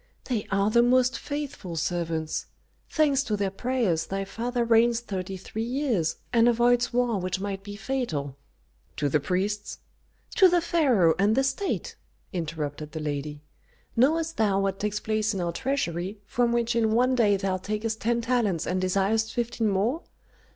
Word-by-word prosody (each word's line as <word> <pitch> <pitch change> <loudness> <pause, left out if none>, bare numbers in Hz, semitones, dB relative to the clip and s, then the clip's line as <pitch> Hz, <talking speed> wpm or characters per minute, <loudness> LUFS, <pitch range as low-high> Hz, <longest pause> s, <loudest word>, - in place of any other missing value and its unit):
"They 235 -5 -2
are 200 +1 +2
the 235 +1 +5
most 250 +1 +3
faithful 280 - -5
servants. 165 -1 -2 0.4
Thanks 290 -4 +3
to 210 -2 -1
their 200 -1 -1
prayers 195 -8 0
thy 195 0 -3
father 235 +4 -2
reigns 230 0 +4
thirty 190 -4 -5
three 210 +4 -6
years, 235 - 0 0.2
and 235 0 +5
avoids 240 +1 +3
war 240 -4 +1
which 185 +1 -2
might 195 -1 -4
be 205 +1 -8
fatal." 205 - -3 0.6
"To 145 - 0
the 150 - +2
priests?" 195 +7 -2 0.6
"To 380 -3 +8
the 350 0 +3
pharaoh 270 - +3
and 205 +2 +3
the 270 - +3
state!" 275 +9 -2 0.4
interrupted 150 -3 -4
the 160 - -4
lady. 150 0 -4 0.5
"Knowest 320 +6 +2
thou 205 -3 +2
what 195 0 -1
takes 210 0 -1
place 215 -1 0
in - - -2
our 175 -1 -1
treasury, 190 -4 -2
from 240 +2 +1
which 235 -1 +1
in 220 -2 +2
one 250 +3 +3
day 210 -5 +3
thou 190 -1 -1
takest 215 +3 -3
ten 235 +1 +1
talents 230 -8 0
and 185 +1 -1
desirest 200 +4 +1
fifteen 235 -2 -1
more? 215 - 0
215 Hz, 165 wpm, -26 LUFS, 185-245 Hz, 0.6 s, To